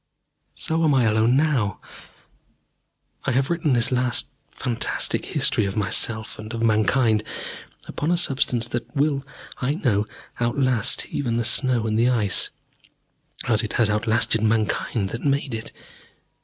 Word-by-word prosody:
So 160 +1 0
am 150 -3 +4
I 130 - +4
alone 110 +2 +3
now. 135 -9 +1 1.5
I - - +1
have 135 +5 +1
written 160 -5 +1
this 120 0 +2
last 125 -1 +1 0.2
fantastic 120 -4 -1
history - - +1
of 100 +1 -3
myself 110 +2 -2
and 110 +1 -7
of 115 - -2
Mankind 110 0 +3 0.6
upon 150 - -3
a 175 - +3
substance 130 -7 +1
that 120 +6 -5
will, 140 -1 +1 0.3
I 130 +3 0
know, 110 - 0 0.3
outlast 120 -1 +1
even 115 -4 -1
the 120 - +1
snow 125 -2 +2
and 110 0 0
the 120 +2 +4
Ice 110 -6 +1 1.0
as 110 -2 +4
it 110 - -4
has 115 -3 +3
outlasted 110 +1 +2
Mankind 110 -1 0
that 115 - -5
made 140 -2 0
it. 110 0 -5
120 Hz, 140 wpm, -23 LUFS, 110-135 Hz, 1.5 s, am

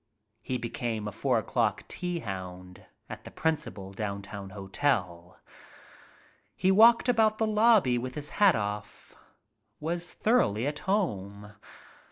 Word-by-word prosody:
He 130 - -3
became 115 -2 -3
a - - -4
four 125 +4 0
o'clock 110 - 0
tea 175 -2 -4
hound 90 -3 -8 0.2
at - - -9
the - - -9
principal 105 -12 -3
downtown 100 -1 -5
hotel. 95 -4 -2 1.2
He 190 - +2
walked 230 +5 +6
about 220 -3 +3
the 220 - +1
lobby 215 - +4
with 130 +1 -6
his 150 -1 -5
hat 200 -3 +7
off. 105 0 -5 0.7
Was 170 +3 -3
thoroughly 170 - +1
at 150 +1 -2
home. 105 - -2
120 Hz, 125 wpm, -28 LUFS, -, 1.2 s, hat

